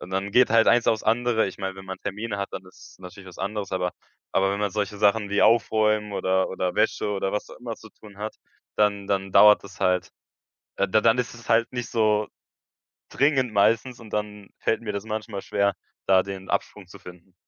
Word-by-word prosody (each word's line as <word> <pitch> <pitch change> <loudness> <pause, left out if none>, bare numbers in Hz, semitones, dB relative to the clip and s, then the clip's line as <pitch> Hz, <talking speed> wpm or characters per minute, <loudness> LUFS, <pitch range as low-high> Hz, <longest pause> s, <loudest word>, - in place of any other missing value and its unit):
und 90 - -10
dann 95 +1 -2
geht 125 +2 +5
halt 115 0 +5
eins 120 -1 +4
auf's 110 - +1
andere. 115 0 +2
Ich 95 - -7
meine, 95 -1 -5
wenn 95 - -10
man 95 0 -6
Termine 105 +2 -4
hat, 100 0 -3
dann 95 - -7
ist 90 - -17
es - - -20
natürlich 95 +1 -11
was 90 - -14
anderes, 100 +1 -4
aber 90 -1 -1 0.4
aber 95 0 +2
wenn 100 - -2
man 105 -2 -1
solche 105 -1 -3
Sachen 105 0 +2
wie 100 - +1
Aufräumen 110 -2 +2
oder 95 -1 +1
oder 90 -1 -2
Wäsche - - +1
oder 95 -1 -1
was 105 - -3
auch - - -13
immer 120 -2 -6
zu 110 - -14
tun 105 -2 -16
hat, 105 +1 -5 0.4
dann 100 -1 +1
dann 95 -1 -1
dauert 105 +2 +7
das 100 0 -13
halt. 90 0 +1 0.7
Äh, 100 - 0
d 110 +3 +3
dann 115 +2 +4
ist 125 -1 -2
es 120 -1 -14
halt 115 +1 +2
nicht 120 -2 -4
so 105 -2 +1 0.8
dringend 135 -4 +1
meistens 115 +4 +2
und 115 -2 -13
dann 105 -1 -4
fällt 115 - 0
mir 105 -2 -4
das 100 0 -4
manchmal 110 -2 -5
schwer, 100 -1 0 0.3
da 95 -1 +5
den 95 -1 -8
Absprung 105 -3 -3
zu 90 - -14
finden. 90 +1 -14
105 Hz, 220 wpm, -25 LUFS, 95-110 Hz, 0.8 s, dauert